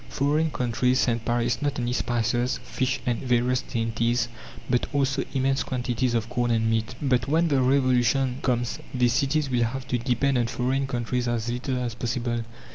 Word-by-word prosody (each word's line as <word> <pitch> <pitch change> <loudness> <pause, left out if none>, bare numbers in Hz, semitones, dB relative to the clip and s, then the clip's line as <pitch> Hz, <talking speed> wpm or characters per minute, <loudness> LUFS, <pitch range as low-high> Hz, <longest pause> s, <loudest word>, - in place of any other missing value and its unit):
Foreign 150 +3 +1
countries 125 -1 +1
send 115 -2 0
Paris 120 0 0
not 145 -1 -1
only 120 0 -1
spices, 120 +1 0
fish, 130 0 -1
and 120 -2 0
various 125 0 +1
dainties, 115 0 -1 0.4
but 125 -1 +1
also 135 -1 +1
immense 135 0 +2
quantities 125 -1 -1
of 115 -1 0
corn 120 +1 -1
and 115 -1 +2
meat. 115 +2 0
But 125 -4 +1
when 165 +3 +2
the 140 -3 +3
Revolution 130 0 +2
comes 120 -2 -1 0.2
these 125 -2 +3
cities 140 +1 +1
will 120 -2 +2
have 130 +3 -5
to 125 - +1
depend 125 +2 +1
on 120 - +1
foreign 130 +3 -1
countries 125 -1 -2
as 120 0 -1
little 125 +1 -2
as 125 -2 -2
possible. 120 0 -2
125 Hz, 175 wpm, -25 LUFS, 120-130 Hz, 0.4 s, the